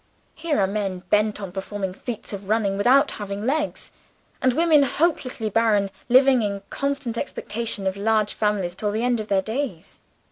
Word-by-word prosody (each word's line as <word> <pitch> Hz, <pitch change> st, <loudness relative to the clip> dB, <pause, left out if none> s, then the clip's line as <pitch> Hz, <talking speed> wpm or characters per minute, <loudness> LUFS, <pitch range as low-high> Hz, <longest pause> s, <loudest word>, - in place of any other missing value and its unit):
Here 315 Hz, -6 st, -1 dB
are 195 Hz, -, +4 dB
men 195 Hz, -2 st, -3 dB
bent 210 Hz, 0 st, +2 dB
on 195 Hz, -3 st, -6 dB
performing 195 Hz, 0 st, -4 dB
feats 225 Hz, +1 st, -6 dB
of 200 Hz, 0 st, -7 dB
running, 210 Hz, -3 st, +1 dB
without 250 Hz, +8 st, +4 dB
having 205 Hz, 0 st, -5 dB
legs; 300 Hz, +3 st, -2 dB, 0.5 s
and 255 Hz, -, +4 dB
women, 315 Hz, +1 st, +4 dB
hopelessly 275 Hz, -5 st, 0 dB
barren, 210 Hz, -3 st, +2 dB, 0.2 s
living 260 Hz, 0 st, +5 dB
in 200 Hz, -2 st, -3 dB
constant 280 Hz, -4 st, -2 dB
expectation 225 Hz, -6 st, -2 dB
of 190 Hz, 0 st, 0 dB
large 215 Hz, +1 st, +1 dB
families 205 Hz, -5 st, -1 dB
to 210 Hz, -, -1 dB
the 215 Hz, +3 st, -1 dB
end 245 Hz, -1 st, +1 dB
of 215 Hz, -, -5 dB
their 195 Hz, -2 st, +1 dB
days. 220 Hz, -, -5 dB
215 Hz, 170 wpm, -23 LUFS, 200-255 Hz, 0.5 s, living